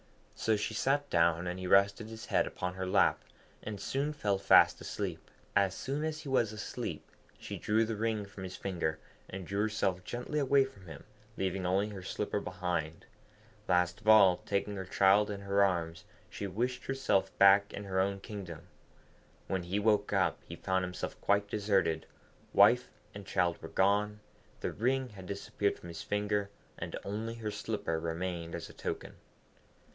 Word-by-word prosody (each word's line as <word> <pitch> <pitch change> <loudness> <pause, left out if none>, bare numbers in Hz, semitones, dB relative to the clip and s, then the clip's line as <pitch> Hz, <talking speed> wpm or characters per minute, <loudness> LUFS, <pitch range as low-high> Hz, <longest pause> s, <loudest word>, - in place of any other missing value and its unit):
So 110 - +1
she 105 - -2
sat 145 +2 +1
down, 85 0 +3
and 90 +1 -3
he 95 - -4
rested 100 +3 +4
his 110 0 -8
head - - +2
upon 90 0 -4
her 95 0 -4
lap, 95 - +3 0.4
and 105 -2 -6
soon 140 +7 -1
fell 105 -10 0
fast - - +6
asleep. - - -5 0.3
As 95 -1 +3
soon 140 +3 -3
as 155 0 -2
he 150 - -7
was 120 -5 +2
asleep, 105 -2 -5 0.3
she - - -7
drew 110 +2 +2
the 110 0 -3
ring 110 -1 -1
from 100 -1 -11
his 95 -1 -6
finger, 85 -5 -2 0.3
and 95 -1 -6
drew 100 +3 -1
herself 100 -4 0
gently 125 +8 -3
away 140 -1 +4
from 100 -9 -14
him, 80 -4 -9 0.3
leaving 95 -1 -1
only 100 +3 +1
her 100 -2 -7
slipper 105 +2 -2
behind. 90 -4 -3 0.6
Last 90 +1 +2
of 105 - -14
all, 100 -5 +8
taking 100 +1 -2
her 95 -1 -5
child 100 +3 +4
in 100 -1 -4
her 100 0 +3
arms, 85 -3 -1 0.3
she 100 - -4
wished 120 +7 -2
herself 135 -8 +1
back 100 +1 +6
in 100 - -6
her 95 -1 -1
own 100 +1 +1
kingdom. 95 -6 -7 0.8
When 95 -1 -1
he 90 +3 -2
woke 105 -1 +2
up, - - +2
he - - -7
found 95 0 0
himself 90 0 -5
quite 100 0 +2
deserted; 95 -6 +1 0.5
wife - - +6 0.2
and 100 -2 -9
child 90 -3 +1
were - - -7
gone, 105 +2 +2 0.4
the - - -1
ring 130 +3 0
had 95 -4 -11
disappeared 100 +1 -1
from 85 - -11
his 85 -1 -7
finger, 105 0 -1 0.3
and - - -5
only 110 +3 -4
her 110 -2 -4
slipper 105 -6 -2
remained 85 0 -3
as - - -6
a - - -13
token. - - -5
100 Hz, 175 wpm, -32 LUFS, 90-105 Hz, 0.8 s, all